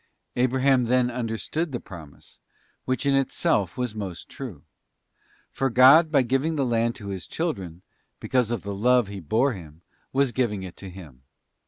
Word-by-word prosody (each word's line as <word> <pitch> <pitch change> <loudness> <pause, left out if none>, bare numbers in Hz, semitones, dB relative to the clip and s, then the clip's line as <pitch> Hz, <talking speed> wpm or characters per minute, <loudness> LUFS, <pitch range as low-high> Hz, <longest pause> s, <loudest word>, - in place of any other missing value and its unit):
Abraham 130 +1 +3
then 125 +1 +2
under 115 -2 -3
stood 160 +7 -3
the 120 - -3
promise, 80 -8 -13 0.5
which 130 +2 -1
in 140 - +3
itself 135 - +1
was 125 -3 -2
most 95 -5 -6
true: 120 - -8 0.9
for 135 - 0
God 135 +7 +7
by 140 -4 +4
giving 135 +6 0
the 140 -3 +1
land 115 -1 +1
to 100 -2 -8
his 95 -3 -5
children, 95 - -4 0.4
because 125 -4 +1
of 120 -5 -3
the 100 0 -4
love 120 +2 +3
He 100 -1 -6
bore 115 - +1
him, 80 -4 -12 0.3
was 135 -1 +2
giving 110 -6 -1
it 90 -2 -8
to 95 - -8
him. 80 -9 -12
120 Hz, 170 wpm, -25 LUFS, 95-130 Hz, 0.9 s, God